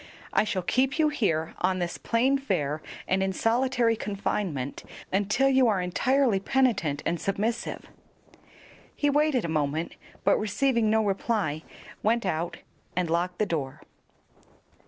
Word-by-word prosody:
I - - +3
shall 190 -4 -2
keep 260 - +1
you 310 -1 +4
here 170 - 0
on 185 +1 +1
this 175 -1 -3
plain 260 +4 +2
fare 155 - -1 0.3
and 190 +1 +1
in 190 0 0
solitary 240 +1 +2
confinement 195 - -3 0.3
until 205 +7 +2
you 265 -2 +4
are 205 -4 +2
entirely 235 +5 +2
penitent 200 - +1
and 170 0 -1
submissive." 215 +4 -2 1.1
He 290 -1 +1
waited 290 - +2
a - - -1
moment, 155 +1 -1 0.3
but - - +4
receiving 220 +2 +1
no 220 0 +3
reply, 195 -6 -1 0.4
went 230 +1 +1
out 170 -1 -2 0.4
and 175 -2 0
locked 175 +1 0
the 215 - +1
door. 145 -8 -3
205 Hz, 135 wpm, -27 LUFS, 170-245 Hz, 1.1 s, you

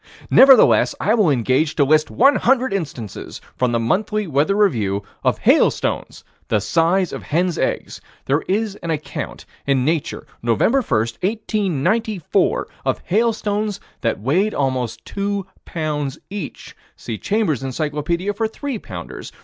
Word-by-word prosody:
Nevertheless 265 -3 +7
I 215 - +2
will 210 -8 +3
engage 135 +4 +1
to 145 - +4
list 155 +2 +3
one 275 +3 +4
hundred 260 -2 +2
instances, 140 - -5 0.2
from 125 -1 +1
the 115 - +1
Monthly 210 - 0
Weather 155 +4 +1
Review, 110 - +1 0.2
of - - +2
hailstones - - +1 0.2
the 105 - +2
size 170 - +1
of - - -5
hens' 175 +2 0
eggs. - - -2 0.2
There 145 +4 +1
is 205 +1 0
an 170 - -7
account 150 -3 -4 0.2
in 135 -2 +2
Nature, 155 -1 -1 0.2
Nov. 115 -2 0
1, - - +4
1894, 200 - 0 0.2
of - - 0
hailstones 210 0 0 0.2
that 115 - 0
weighed 175 - +1
almost 130 -4 -2
two 200 -1 -2 0.2
pounds 150 -4 -3
each. 200 -8 -7 0.2
See 110 -2 -6
Chambers' 200 - 0
Encyclopedia 150 +7 -2
for 220 +2 -1
three 265 +1 -5
pounders. 85 - -8
165 Hz, 135 wpm, -20 LUFS, 135-210 Hz, 0.2 s, Nevertheless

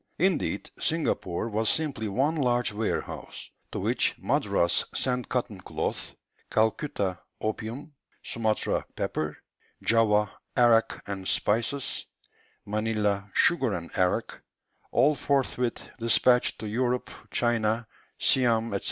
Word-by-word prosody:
Indeed, 185 -2 0
Singapore 115 - 0
was 110 0 0
simply 145 -9 0
one 135 +10 +1
large 120 -7 +1
warehouse, 110 +1 -4 0.2
to - - -4
which - - +1
Madras 85 0 +2
sent 125 -1 -1
cotton 115 -6 -2
cloth; - - -3 0.3
Calcutta, 110 - 0 0.2
opium; 115 +7 -4 0.3
Sumatra, 110 -2 0
pepper; 75 -1 -2 0.5
Java, 105 -2 +3 0.3
arrack 120 -2 +4
and 95 -2 -4
spices; 120 +6 0 0.6
Manilla, 105 -1 0
sugar 130 - +4
and 85 -1 -6
arrack; 90 -2 0 0.5
all 140 +5 +4
forthwith 130 -4 0
despatched 125 +2 +4
to 110 - -6
Europe, 125 +3 0 0.2
China, 115 -1 +1 0.3
Siam, 115 -3 +3
&c. 100 - 0
115 Hz, 105 wpm, -28 LUFS, 105-125 Hz, 0.6 s, arrack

